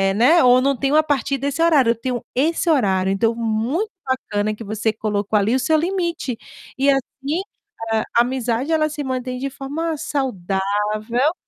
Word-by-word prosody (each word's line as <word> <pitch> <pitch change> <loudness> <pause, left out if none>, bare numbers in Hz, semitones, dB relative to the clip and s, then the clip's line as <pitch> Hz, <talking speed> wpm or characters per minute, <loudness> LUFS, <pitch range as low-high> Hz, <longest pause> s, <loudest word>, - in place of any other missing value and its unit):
né, 265 +10 +5
ou 250 0 +6
"não 275 0 +1
tenho 275 +3 +1
a 310 - +7
partir 280 -2 0
desse 280 +3 -2
horário 295 -8 +4
eu - - 0
tenho 245 +1 -3
esse 325 +6 +1
horário.", 190 - +2
então 225 +4 +1
muito 235 - -1
bacana 215 -5 -1
que 225 - -9
você 215 +1 -1
colocou 210 -1 -1
ali 220 +5 +1
o - - +2
seu 310 +5 +2
limite 340 -7 -2 0.4
e 275 +1 +3
assim, 275 +4 -2 0.5
a 220 -1 +1
a - - +8
amizade 250 +2 -1
ela 310 -1 +3
se 295 -1 -5
mantém 255 -1 -3
de 275 +2 -2
forma 295 +4 -4
saudável. 215 - -1
255 Hz, 175 wpm, -21 LUFS, 220-290 Hz, 0.5 s, a